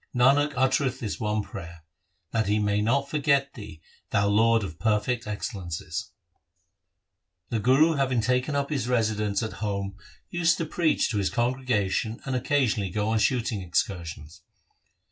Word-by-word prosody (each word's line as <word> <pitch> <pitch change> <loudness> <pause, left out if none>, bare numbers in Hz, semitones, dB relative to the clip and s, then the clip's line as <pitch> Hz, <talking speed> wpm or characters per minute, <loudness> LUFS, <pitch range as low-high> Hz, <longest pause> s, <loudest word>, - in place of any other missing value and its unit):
Nanak 140 +4 +4
uttereth 130 0 +1
this 110 -4 -4
one 105 -1 0
prayer 85 -5 -9 0.2
— 80 - -48
That 110 -2 0
he 105 +1 +2
may 105 -1 +1
not 135 +6 +1
forget 140 -2 +1
Thee, 100 -8 -10 0.3
Thou 100 0 +2
Lord 115 +2 +4
of 80 -4 -7
perfect 110 +2 0
excellences! 95 -5 -4 1.4
1 115 - -1
The - - -7
Guru 145 +7 +5
having 135 -4 +1
taken 125 +5 0
up 140 +1 -1
his 135 -5 -1
residence 110 -3 +1
at 110 - -4
home 100 -2 -2 0.4
used 170 -1 +2
to 165 - -2
preach 160 -1 +1
to 110 - -1
his 100 - +1
congregation 120 -3 0
and 135 - -2
occasionally 125 -6 +1
go 105 +3 -1
on 110 0 +2
shooting 115 -3 0
excursions. 85 -2 -3
110 Hz, 155 wpm, -26 LUFS, 100-130 Hz, 1.4 s, Guru